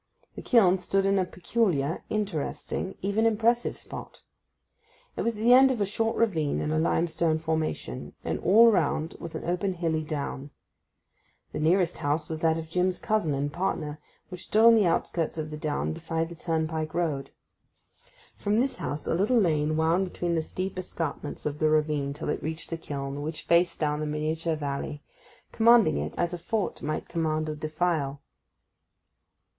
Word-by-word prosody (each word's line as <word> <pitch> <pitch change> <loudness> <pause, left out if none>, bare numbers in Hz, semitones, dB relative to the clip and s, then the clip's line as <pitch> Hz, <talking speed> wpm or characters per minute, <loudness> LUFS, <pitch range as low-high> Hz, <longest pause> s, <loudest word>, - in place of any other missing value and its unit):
The - - -8
kiln 190 -7 +4
stood 195 +2 0
in 195 0 +3
a 185 - +1
peculiar, 175 -5 -1
interesting, 195 -1 -3
even 205 +3 +2
impressive 230 +2 +1
spot. - - -9 0.9
It - - -2
was 230 -2 -1
at 215 - -4
the 240 +2 +7
end 265 +1 +8
of 255 -3 -1
a 200 - +2
short 225 +3 -1
ravine 165 -11 +1
in 150 - -2
a 155 - +1
limestone 165 0 +1
formation, 160 - -3
and - - -2
all 225 +4 +6
around 160 -4 0
was 170 - -7
an - - -5
open 180 +2 0
hilly 165 -2 -1
down. 145 -2 -4 1.0
The - - -4
nearest 170 +2 +2
house 150 0 -1
was 160 -1 -3
that 160 0 +2
of 160 0 -5
Jim's 180 +2 0
cousin 210 -10 0
and 145 +1 -2
partner, 160 -5 -2 0.3
which 180 -1 -8
stood 220 +2 +4
on 230 - +9
the 215 -5 +4
outskirts 165 -1 -1
of 155 -1 -4
the - - -4
down 150 +1 -2
beside 165 0 -2
the 170 - -9
turnpike 160 -1 -2
road. 150 -6 -1 1.1
From 205 +1 0
this 260 +3 +1
house 145 +1 -4
a - - 0
little 205 +9 +2
lane 155 -5 +1
wound 170 +4 +2
between 175 -1 -2
the 165 - +1
steep 185 +4 -4
escarpments 160 -5 -5
of 150 0 -3
the 155 - +3
ravine 150 -2 +1
till 150 - -5
it - - -1
reached 160 +2 -5
the 165 - -2
kiln, 140 -2 -5
which 155 +2 -5
faced 170 +1 +3
down 150 -1 0
the 155 - -2
miniature 155 +2 -1
valley, 145 0 -4 0.5
commanding 230 - +5
it 75 +2 -4
as 175 0 0
a 175 - -4
fort 210 +4 -2
might 155 +1 -3
command 155 -2 -1
a 155 - -2
defile. 155 -2 -1
165 Hz, 175 wpm, -27 LUFS, 155-190 Hz, 1.1 s, on